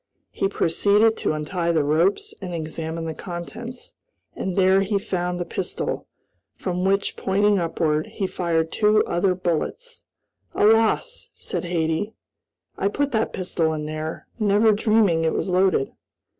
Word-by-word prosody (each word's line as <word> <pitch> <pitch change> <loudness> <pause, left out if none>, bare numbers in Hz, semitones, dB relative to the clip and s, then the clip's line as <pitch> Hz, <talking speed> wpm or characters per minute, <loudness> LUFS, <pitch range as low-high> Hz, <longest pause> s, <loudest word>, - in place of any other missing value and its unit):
He - - 0
proceeded 205 +4 +3
to - - 0
untie 170 +3 -1
the 160 -3 +2
ropes 165 +7 +1
and 180 -2 -5
examine 160 0 -4
the 160 - -3
contents, 205 +9 -8 0.4
and 190 -2 -3
there 190 0 +4
he 200 +1 +1
found 180 -2 -2
the 175 - -2
pistol, - - -3 0.5
from 180 -1 -3
which, 195 +1 +1
pointing 205 +1 +2
upward, 160 -2 0
he 195 - -3
fired 165 -3 -1
two 215 0 +3
other 180 +2 +1
bullets. 185 - -3 0.5
"Alas!" 225 - +2
said - - -4
Hattie, 170 +4 -1 0.6
"I 195 - +2
put 285 +7 0
that 220 -1 0
pistol 175 -3 -1 0.2
there, 155 +1 -5
never 210 +1 +4
dreaming 210 -6 +3
it 160 - +1
was - - -1
loaded." 185 -6 +2
185 Hz, 140 wpm, -23 LUFS, 165-205 Hz, 0.6 s, there